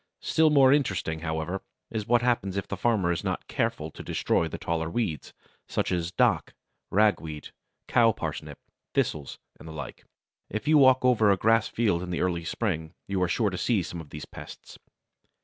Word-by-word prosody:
Still 160 0 +4
more 135 -3 +6
interesting, 95 - 0
however, 80 +3 -3 0.3
is 110 -2 -3
what 120 0 +3
happens 105 -6 0
if 100 - -3
the - - -3
farmer 100 -4 +1
is 85 - -2
not - - -2
careful 75 +1 -2
to - - -10
destroy 80 - 0
the - - -6
taller 80 -1 -2
weeds, 85 -7 -2 0.4
such - - -1
as 85 -1 -1
Dock, - - +1 0.3
Ragweed, 85 -8 +1 0.4
Cow 115 -1 +5
Parsnip, - - -5 0.4
Thistles, 75 -3 -1 0.2
and - - -11
the 80 - -8
like. 80 - -8 0.5
If 110 +4 -4
you 155 -1 +6
walk 130 -1 +5
over 110 -4 +4
a 100 - +4
grass 115 +2 +3
field 105 -7 0
in 90 -1 -3
early 85 -2 -1
spring, 80 -5 -2
you 95 -2 -1
are 90 - +3
sure 105 +2 +1
to 95 - -4
see 110 -7 +1
some 85 0 -6
of 75 - -13
these 75 - -7
pests. - - -11
95 Hz, 185 wpm, -27 LUFS, 85-115 Hz, 0.5 s, more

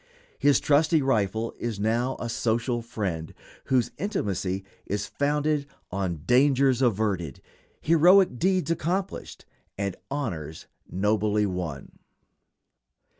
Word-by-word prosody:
His 145 -1 +4
trusty 150 +1 +3
rifle 110 -3 0
is 115 -4 -3
now 115 +5 0
a 120 - -3
social 115 +1 0
friend, 95 -8 -4 0.3
whose 125 -3 +1
intimacy 100 - -2 0.2
is 100 +1 -2
founded 150 0 0 0.2
on 90 -5 -3
dangers 135 +2 +4
averted, 100 - 0 0.4
heroic 170 -2 +5
deeds 185 -2 +1
accomplished, 180 +4 -3 0.3
and 100 -2 -2
honors 90 - -4 0.2
nobly 105 +2 +1
won. 90 -8 -5
115 Hz, 100 wpm, -26 LUFS, 100-145 Hz, 0.4 s, heroic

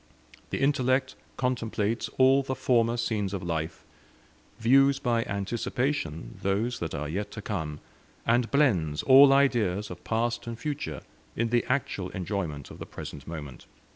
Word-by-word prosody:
The - - -2
intellect 130 -1 +2 0.2
contemplates 115 -3 -1
all 135 +1 +6
the 130 -1 -3
former 120 -2 +2
scenes 105 -4 -1
of 95 - -5
life; 80 -1 -3 0.7
views 135 +4 +5
by 120 -3 +1
anticipation 100 - -2
those 105 +6 0
that 80 - -4
are 75 +1 -3
yet 100 +7 -3
to - - -6
come; 75 -2 -3 0.5
and 115 +1 +2
blends 90 - +2
all 135 +1 +8
ideas 115 -9 +2
of 90 - -9
past 115 +1 -1
and 115 -1 -5
future 140 - -4 0.3
in 115 0 0
the 120 +1 +2
actual 125 -8 -1
enjoyment 90 -7 -4
of - - -11
the - - -7
present 70 -1 -8
moment." 75 -5 -8
115 Hz, 145 wpm, -28 LUFS, 90-130 Hz, 0.7 s, all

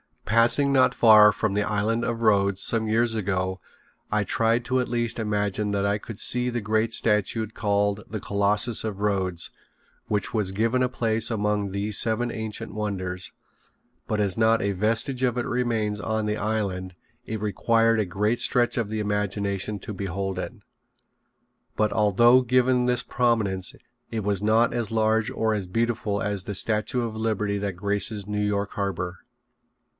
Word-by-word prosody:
Passing 120 +6 +3
not 130 -1 +4
far 105 -2 +7
from 105 0 -1
the 105 - +1
Island 105 +3 0
of 115 0 -3
Rhodes 100 -3 +2
some 110 -1 0
years 115 +1 +1
ago 95 -3 -2 0.5
I 105 -1 +1
tried 115 +3 +1
to 130 +1 +1
at 125 - -1
least 120 -1 -1
imagine 105 -1 -1
that 100 0 0
I 100 +1 +1
could 110 0 -9
see 125 0 +1
the 120 -1 -3
great 110 +2 0
statue 110 +1 +1
called 105 -1 -1
the 110 -2 -5
Colossus 105 +3 +1
of 100 -2 -5
Rhodes 95 -4 0 0.6
which 105 -2 -2
was 105 -4 0
given 115 +5 +1
a 125 - +2
place 115 -2 0
among 105 -2 -1
these 100 +1 0
seven 120 +1 +2
ancient 110 -2 -5
wonders, 95 -4 -2 0.7
but 105 -1 0
as 100 -3 +1
not 115 0 +3
a 100 - 0
vestige 115 +6 0
of 125 -2 +1
it 120 - -1
remains 115 -4 -1
on 110 0 -2
the 105 0 -1
island 95 -4 -3 0.3
it 110 -1 -5
required 115 +2 +2
a 105 - +1
great 105 +6 -1
stretch 120 +1 +1
of 115 -4 -1
the 110 0 -2
imagination 105 0 -2
to 105 +3 -7
behold 95 0 -4
it. - - -5 1.2
But 105 -1 +1
although 120 +5 +5
given 125 0 +2
this 125 0 +1
prominence 110 -7 0 0.3
it 110 -2 -3
was 100 -1 -1
not 110 +3 +3
as 120 -3 -1
large 110 0 +1
or 110 -1 0
as 100 -4 -3
beautiful 110 0 -1
as 100 -2 -2
the 105 - -5
Statute 110 +5 0
of 110 -1 -6
Liberty 105 -2 -1
that 100 -1 -3
graces 100 +2 0
New 105 0 -2
York 100 -1 -1
harbor. 90 -3 -3
105 Hz, 170 wpm, -25 LUFS, 100-115 Hz, 1.2 s, far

